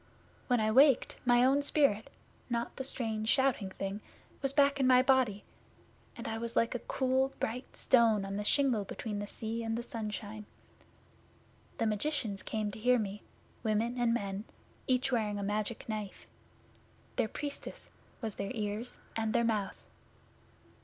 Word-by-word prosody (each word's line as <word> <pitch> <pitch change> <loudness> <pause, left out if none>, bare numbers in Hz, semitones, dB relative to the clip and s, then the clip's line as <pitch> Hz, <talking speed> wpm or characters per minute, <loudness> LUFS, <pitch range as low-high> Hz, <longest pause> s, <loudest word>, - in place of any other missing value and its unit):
When 245 -2 +3
I 215 0 +2
waked, 265 +2 +5
my 245 0 +5
own 275 +2 +4
spirit 280 -7 +2 0.4
not 235 -1 -2
the 265 - -3
strange, 220 -4 0
shouting 265 -8 +2
thing 195 +2 -5 0.4
was 275 -2 +1
back 280 0 +3
in 265 - +3
my 255 0 +6
body, 255 -7 +3 0.7
and - - -6
I 225 0 -3
was 235 0 -4
like 230 - +2
a 245 - -2
cool 265 +2 0
bright 245 +3 -4
stone 225 -5 +4
on 195 0 -4
the 205 - -2
shingle 250 -2 +3
between 205 +1 -5
the 205 - -4
sea 225 +2 -4
and 225 0 -2
the 235 - -3
sunshine. 215 -3 -5 1.3
The 230 - 0
magicians 220 -2 -1
came 215 -1 -2
to 210 - -8
hear 250 +3 +4
me 210 -2 -3 0.4
women 230 +3 0
and 240 -1 +3
men 200 -2 -2 0.4
each 255 +1 +2
wearing 215 -4 0
a 200 - -3
Magic 210 +2 -2
Knife. 215 -3 -5 0.9
Their - - +2
Priestess 285 +5 -6 0.3
was 220 -3 -3
their 195 +1 -4
Ears 215 +2 -3 0.2
and 220 -1 0
their 235 - +3
Mouth. 215 -4 -1
230 Hz, 160 wpm, -32 LUFS, 210-255 Hz, 1.3 s, my